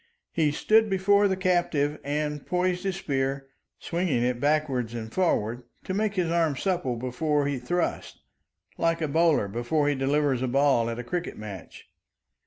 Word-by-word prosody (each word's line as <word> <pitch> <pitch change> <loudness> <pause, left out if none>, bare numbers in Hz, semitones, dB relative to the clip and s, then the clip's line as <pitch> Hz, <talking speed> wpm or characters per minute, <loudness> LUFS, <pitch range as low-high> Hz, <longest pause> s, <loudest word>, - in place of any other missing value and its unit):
He 155 -3 +1
stood 220 +8 +3
before 200 +1 +3
the 190 -1 -1
captive 175 -6 +1
and 150 0 -2
poised 180 +1 -1
his 190 -2 -1
spear, 135 -5 -2 0.3
swinging 170 -8 -1
it 125 0 0
backward 140 -5 0
and 110 -1 -6
forward, 120 - 0 0.2
to 185 - -4
make 205 +1 0
his 175 -3 0
arm 165 -4 +2
supple 175 -6 -1
before 140 +5 -1
he 140 -2 -1
thrust, 175 +8 -2 0.6
like 165 0 +1
a 155 - 0
bowler 160 -7 +3
before 120 +8 0
he - - +2
delivers 135 -1 +1
a 130 - 0
ball 135 -3 +2
at 115 - -4
a 120 - -4
cricket 175 +8 -4
match. 100 -5 -9
150 Hz, 165 wpm, -26 LUFS, 130-175 Hz, 0.6 s, stood